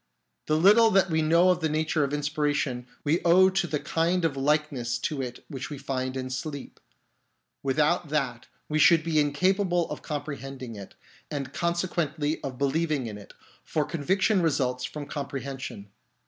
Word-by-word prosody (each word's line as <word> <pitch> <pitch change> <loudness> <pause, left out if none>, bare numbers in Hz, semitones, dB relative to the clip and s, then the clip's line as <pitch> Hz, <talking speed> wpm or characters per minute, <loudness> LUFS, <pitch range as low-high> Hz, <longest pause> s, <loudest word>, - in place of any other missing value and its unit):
The 155 - +2
little 210 +7 +6
that 190 -3 +3
we 160 0 +2
know 170 +4 +4
of 180 - 0
the 160 -2 0
nature 155 0 +1
of 140 - -1
inspiration 145 -4 -1 0.2
we 155 +4 +1
owe 185 +2 +5
to 190 -2 0
the 150 -3 -1
kind 170 +3 0
of 155 -4 0
likeness 135 -4 0
to 135 +3 -3
it 125 -1 -7
which 135 -4 -6
we 145 - -6
find 130 -1 -3
in 130 0 -4
sleep; 140 +2 -6 0.8
without 150 +4 +1
that 130 -5 -2 0.2
we 155 0 0
should 165 0 +6
be 160 -1 +1
incapable 175 +4 +2
of - - -5
compre 150 -1 -4
hending 130 -2 -7
it, 100 -2 -10 0.3
and 140 -2 -4
consequently 170 -3 -1
of 130 -2 -5
believing 145 0 0
in 105 -2 -6
it, 100 - -14 0.3
for 150 -2 -1
conviction 185 +6 +1
results 130 -6 0
from 150 -1 -6
comprehension. 135 -7 -6
150 Hz, 165 wpm, -27 LUFS, 135-170 Hz, 0.8 s, little